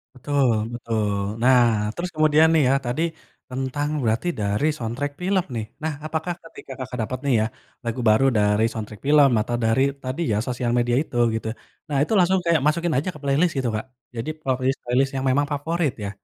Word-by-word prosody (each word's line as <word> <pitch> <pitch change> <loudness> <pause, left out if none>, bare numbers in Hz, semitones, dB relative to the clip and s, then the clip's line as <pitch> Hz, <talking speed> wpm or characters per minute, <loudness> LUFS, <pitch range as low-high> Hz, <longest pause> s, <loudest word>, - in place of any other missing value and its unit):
Betul 130 -2 +1 0.2
betul. 110 -3 -1 0.3
Nah, 125 -1 +6 0.3
terus 180 +1 -3
kemudian 155 +1 +5
nih 160 -2 +4
ya, - - +4
tadi 125 +6 -1 0.5
tentang 135 +3 -2
berarti 115 +8 0
dari 105 +8 +1
soundtrack 125 +4 -3
film 190 -1 +1
nih, 110 - -2 0.2
nah 160 -1 -1
apakah 160 +3 -2
ketika 150 - -12
Kakak 130 -1 -5
dapet 130 +3 -4
nih 140 - +2
ya 110 - +2 0.4
lagu 115 +1 -3
baru 110 +5 +4
dari 105 +1 +3
soundtrack 105 -2 -7
film 145 -2 +6
atau 120 +2 -2
dari 115 +4 +3 0.2
tadi 130 +6 -3
ya 105 - +2
sosial 120 -1 -1
media 120 0 +2
itu 120 - -7 0.2
gitu, 110 - -4 0.4
nah 145 - 0
itu 155 - -2
langsung 185 +1 +3
kayak 165 -4 +3
masukin 170 +1 +1
aja 160 +7 0
ke 150 - -10
playlist 145 +6 +2
gitu, 125 -2 0
Kak? 110 - -3 0.3
Jadi 115 +6 -4
playlist- 130 -1 -1
playlist 130 +3 +1
yang 135 0 -2
memang 145 +2 +2
favorit 155 +1 0
ya. 100 - -3
130 Hz, 190 wpm, -23 LUFS, 120-155 Hz, 0.5 s, Nah